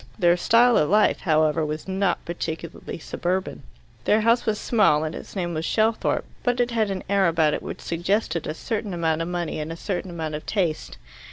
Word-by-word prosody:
Their 175 Hz, -4 st, +4 dB
style 235 Hz, +6 st, +4 dB
of 150 Hz, -, +1 dB
life, 210 Hz, +2 st, +4 dB
however, 155 Hz, -1 st, +2 dB
was 155 Hz, +2 st, -4 dB
not 190 Hz, 0 st, 0 dB
particularly 170 Hz, -1 st, -5 dB
suburban. 180 Hz, +2 st, -3 dB, 0.4 s
Their 215 Hz, +1 st, +4 dB
house 230 Hz, +2 st, +2 dB
was 215 Hz, -1 st, +1 dB
small 205 Hz, -10 st, +3 dB
and 155 Hz, 0 st, -3 dB
its -, -, -9 dB
name 175 Hz, -3 st, -2 dB
was 160 Hz, 0 st, -2 dB
Shelthorpe, 220 Hz, +5 st, +1 dB, 0.2 s
but 245 Hz, 0 st, 0 dB
it 245 Hz, 0 st, +1 dB
had 220 Hz, -3 st, +1 dB
an 195 Hz, -1 st, -3 dB
air 195 Hz, -1 st, +3 dB
about 160 Hz, -2 st, +2 dB
it -, -, -2 dB
which -, -, -7 dB
suggested 175 Hz, 0 st, -1 dB
a 155 Hz, -, -3 dB
certain 210 Hz, -1 st, -3 dB
amount 165 Hz, -1 st, 0 dB
of 165 Hz, -, -2 dB
money 175 Hz, -3 st, -3 dB
and 155 Hz, +1 st, -4 dB
a 165 Hz, -, -6 dB
certain 185 Hz, 0 st, -3 dB
amount 160 Hz, -3 st, -4 dB
of 150 Hz, -, -6 dB
taste. 175 Hz, -7 st, -1 dB
175 Hz, 200 wpm, -24 LUFS, 160-210 Hz, 0.4 s, Their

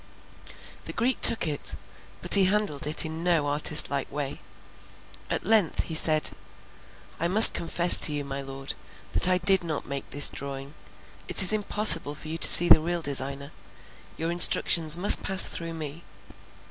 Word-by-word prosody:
The -, -, -11 dB
Greek 255 Hz, +2 st, -5 dB
took 225 Hz, -, +3 dB
it, 150 Hz, -3 st, -7 dB, 0.5 s
but -, -, -5 dB
he 195 Hz, -1 st, +3 dB
handled 190 Hz, -8 st, -5 dB
it 155 Hz, +2 st, +2 dB
in 160 Hz, +1 st, -10 dB
no 170 Hz, -4 st, -3 dB
artist 150 Hz, +1 st, +1 dB
like 140 Hz, -1 st, -7 dB
way; 140 Hz, -1 st, -9 dB, 0.9 s
at -, -, -7 dB
length 210 Hz, -5 st, -1 dB
he -, -, -9 dB
said: 155 Hz, -1 st, 0 dB, 0.9 s
"I 170 Hz, -, -4 dB
must 210 Hz, +5 st, +7 dB
confess 170 Hz, +1 st, +1 dB
to -, -, +1 dB
you, 145 Hz, -1 st, -8 dB
my 140 Hz, 0 st, -10 dB
Lord, 135 Hz, 0 st, -11 dB, 0.4 s
that -, -, 0 dB
I 185 Hz, -, -1 dB
did 190 Hz, +1 st, +2 dB
not 155 Hz, -4 st, -8 dB
make 140 Hz, -1 st, -10 dB
this 145 Hz, -, +2 dB
drawing. 140 Hz, 0 st, -11 dB, 0.5 s
It -, -, +4 dB
is 190 Hz, -, +4 dB
impossible 205 Hz, -7 st, -1 dB
for 155 Hz, +1 st, -13 dB
you 165 Hz, +1 st, -9 dB
to -, -, +4 dB
see 175 Hz, -, +8 dB
the -, -, +4 dB
real 170 Hz, +1 st, -7 dB
designer; 140 Hz, 0 st, -2 dB, 0.7 s
your 165 Hz, +1 st, -6 dB
instructions 170 Hz, -2 st, +1 dB
must 190 Hz, +4 st, +5 dB
pass 190 Hz, -1 st, +2 dB
through 165 Hz, -1 st, -9 dB
me. 155 Hz, +1 st, -11 dB
160 Hz, 170 wpm, -22 LUFS, 145-175 Hz, 0.9 s, see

